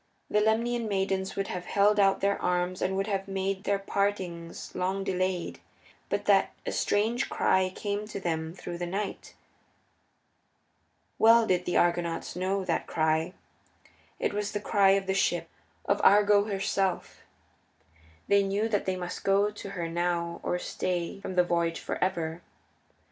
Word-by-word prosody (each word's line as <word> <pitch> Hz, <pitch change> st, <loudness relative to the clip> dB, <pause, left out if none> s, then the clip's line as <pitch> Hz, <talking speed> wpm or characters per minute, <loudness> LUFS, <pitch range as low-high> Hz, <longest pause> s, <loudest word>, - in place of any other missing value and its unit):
The 210 Hz, -, +3 dB
Lemnian 230 Hz, +2 st, +1 dB
maidens 190 Hz, -1 st, -1 dB
would 195 Hz, 0 st, -2 dB
have 180 Hz, -1 st, -4 dB
held 205 Hz, +1 st, +3 dB
out 195 Hz, -1 st, +3 dB
their 200 Hz, +1 st, +1 dB
arms 180 Hz, 0 st, 0 dB
and 190 Hz, +1 st, 0 dB
would 195 Hz, -, 0 dB
have 195 Hz, -2 st, -2 dB
made 195 Hz, 0 st, -2 dB
their 200 Hz, -, +2 dB
partings 195 Hz, -4 st, -3 dB
long 190 Hz, +2 st, -1 dB
delayed, 185 Hz, -2 st, -2 dB, 0.5 s
but -, -, -1 dB
that -, -, +3 dB
a -, -, -2 dB
strange 225 Hz, +5 st, 0 dB
cry 185 Hz, 0 st, +2 dB
came 205 Hz, 0 st, -3 dB
to 210 Hz, -, -6 dB
them 160 Hz, -2 st, -3 dB
through 175 Hz, -2 st, -7 dB
the 175 Hz, -, -3 dB
night. 195 Hz, +3 st, -4 dB, 1.8 s
Well 230 Hz, +1 st, +6 dB
did 180 Hz, -3 st, +1 dB
the 175 Hz, -, 0 dB
Argonauts 170 Hz, -1 st, 0 dB
know 190 Hz, +1 st, -1 dB
that -, -, -1 dB
cry 160 Hz, +2 st, 0 dB, 0.8 s
it -, -, -1 dB
was 205 Hz, 0 st, -2 dB
the 205 Hz, -, -1 dB
cry 200 Hz, -1 st, +4 dB
of 195 Hz, -, -3 dB
the 190 Hz, -, 0 dB
ship, 175 Hz, -3 st, +1 dB, 0.4 s
of -, -, +1 dB
Argo 205 Hz, 0 st, +6 dB
herself. 195 Hz, -2 st, -1 dB, 1.1 s
They 200 Hz, 0 st, +5 dB
knew 200 Hz, +3 st, 0 dB
that 205 Hz, -3 st, -1 dB
they 190 Hz, -, +1 dB
must 180 Hz, -1 st, -6 dB
go 200 Hz, +1 st, +3 dB
to 205 Hz, -1 st, -8 dB
her 175 Hz, -4 st, -4 dB
now 170 Hz, 0 st, -1 dB
or 180 Hz, -, -1 dB
stay 180 Hz, 0 st, -3 dB
from 185 Hz, -, -5 dB
the 180 Hz, -, +5 dB
voyage 170 Hz, -1 st, 0 dB
for -, -, -3 dB
ever. 170 Hz, -3 st, -2 dB
190 Hz, 160 wpm, -28 LUFS, 175-200 Hz, 1.8 s, Well